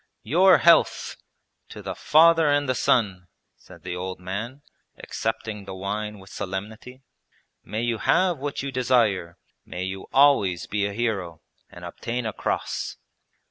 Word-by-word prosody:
'Your 180 Hz, -, +5 dB
health! 170 Hz, -, +3 dB, 0.5 s
To -, -, -10 dB
the -, -, -4 dB
Father 165 Hz, 0 st, +5 dB
and 145 Hz, 0 st, +2 dB
the 130 Hz, -, +2 dB
Son!' 95 Hz, -7 st, +1 dB, 0.3 s
said -, -, -17 dB
the 90 Hz, -1 st, -4 dB
old 90 Hz, +1 st, -5 dB
man, 110 Hz, +10 st, -6 dB, 0.3 s
accepting 110 Hz, -2 st, -4 dB
the 95 Hz, -, -7 dB
wine 105 Hz, +2 st, -4 dB
with 95 Hz, -1 st, -15 dB
solemnity. 110 Hz, +7 st, -7 dB, 0.6 s
'May 110 Hz, +2 st, -4 dB
you 120 Hz, -2 st, -1 dB
have 180 Hz, -, +2 dB
what 140 Hz, 0 st, -4 dB
you 140 Hz, -, -4 dB
desire, 115 Hz, -9 st, +1 dB, 0.3 s
may 90 Hz, -, -6 dB
you 95 Hz, +1 st, -6 dB
always 130 Hz, -, +4 dB
be 100 Hz, -1 st, -1 dB
a 100 Hz, -, -6 dB
hero, 100 Hz, -8 st, -3 dB, 0.3 s
and -, -, -11 dB
obtain 120 Hz, +1 st, -4 dB
a 110 Hz, -, -3 dB
cross.' -, -, -3 dB
110 Hz, 145 wpm, -24 LUFS, 95-130 Hz, 0.6 s, Your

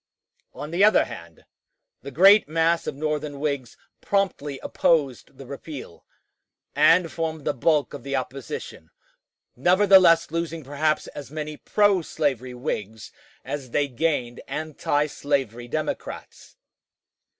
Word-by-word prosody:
On 150 Hz, -, -7 dB
the 175 Hz, +4 st, +2 dB
other 215 Hz, +1 st, +5 dB
hand, 85 Hz, -1 st, -11 dB, 0.6 s
the 140 Hz, -, -8 dB
great 195 Hz, +6 st, +6 dB
mass 165 Hz, +1 st, +1 dB
of -, -, -3 dB
Northern 150 Hz, -1 st, -3 dB
Whigs 140 Hz, -5 st, -3 dB, 0.2 s
promptly 185 Hz, -8 st, -1 dB
opposed 140 Hz, -5 st, 0 dB
the 135 Hz, -, -10 dB
repeal, 140 Hz, -, -9 dB, 0.7 s
and 165 Hz, +3 st, +4 dB
formed 160 Hz, 0 st, -4 dB
the -, -, +1 dB
bulk 145 Hz, +3 st, +1 dB
of 145 Hz, -, -7 dB
the 140 Hz, 0 st, -3 dB
opposition, 130 Hz, -10 st, -6 dB, 0.7 s
nevertheless 180 Hz, +1 st, +5 dB
losing 165 Hz, -1 st, -3 dB
perhaps 150 Hz, +3 st, 0 dB
as 145 Hz, -2 st, -9 dB
many 155 Hz, 0 st, -5 dB
pro 205 Hz, +2 st, +2 dB
slavery 130 Hz, -6 st, -2 dB
Whigs 110 Hz, -5 st, -5 dB, 0.3 s
as 140 Hz, -3 st, -5 dB
they 145 Hz, +4 st, +1 dB
gained 125 Hz, -3 st, -2 dB
antislavery 145 Hz, -5 st, -2 dB
Democrats. 155 Hz, +4 st, -5 dB
150 Hz, 115 wpm, -24 LUFS, 135-165 Hz, 0.7 s, great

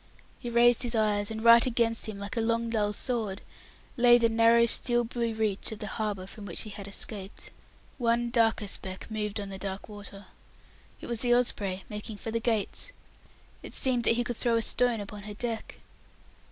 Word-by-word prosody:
He 240 Hz, -, -5 dB
raised 240 Hz, 0 st, +4 dB
his 240 Hz, -1 st, -2 dB
eyes, 210 Hz, -2 st, +1 dB
and 220 Hz, 0 st, -5 dB
right 235 Hz, 0 st, +8 dB
against 230 Hz, -2 st, +1 dB
him, 215 Hz, -2 st, -5 dB
like 200 Hz, +4 st, -6 dB
a 230 Hz, -, 0 dB
long 230 Hz, +1 st, 0 dB
dull 210 Hz, -2 st, +1 dB
sword, 215 Hz, -3 st, -3 dB, 0.5 s
lay 240 Hz, -1 st, +6 dB
the 230 Hz, -1 st, +3 dB
narrow 230 Hz, +1 st, +5 dB
steel 240 Hz, +1 st, +4 dB
blue 235 Hz, -1 st, -2 dB
reach 215 Hz, -2 st, -1 dB
of 220 Hz, -, -6 dB
the 210 Hz, -, -5 dB
harbour 210 Hz, -2 st, -3 dB
from 200 Hz, +1 st, -10 dB
which 175 Hz, -, -2 dB
he 215 Hz, -, -8 dB
had 200 Hz, 0 st, -8 dB
escaped. 200 Hz, 0 st, -6 dB, 0.5 s
One 235 Hz, 0 st, +1 dB
darker 225 Hz, -3 st, +2 dB
speck 190 Hz, +2 st, -6 dB
moved 210 Hz, -1 st, -2 dB
on 200 Hz, -1 st, -5 dB
the 195 Hz, -1 st, -7 dB
dark 195 Hz, 0 st, -5 dB
water. 205 Hz, -1 st, -10 dB, 0.8 s
It -, -, -7 dB
was 235 Hz, -2 st, -3 dB
the 240 Hz, 0 st, +3 dB
Osprey 200 Hz, -6 st, -1 dB
making 210 Hz, 0 st, -7 dB
for 225 Hz, -, -6 dB
the 230 Hz, -, 0 dB
Gates. 230 Hz, -, -2 dB, 0.7 s
It -, -, -10 dB
seemed 250 Hz, -2 st, +1 dB
that 230 Hz, -, +4 dB
he 240 Hz, -, +1 dB
could 240 Hz, -1 st, -4 dB
throw 235 Hz, -2 st, +2 dB
a 230 Hz, -, +1 dB
stone 240 Hz, -2 st, +1 dB
upon 205 Hz, +1 st, -8 dB
her 205 Hz, 0 st, -8 dB
deck. 230 Hz, 0 st, -4 dB
225 Hz, 195 wpm, -28 LUFS, 205-235 Hz, 0.8 s, right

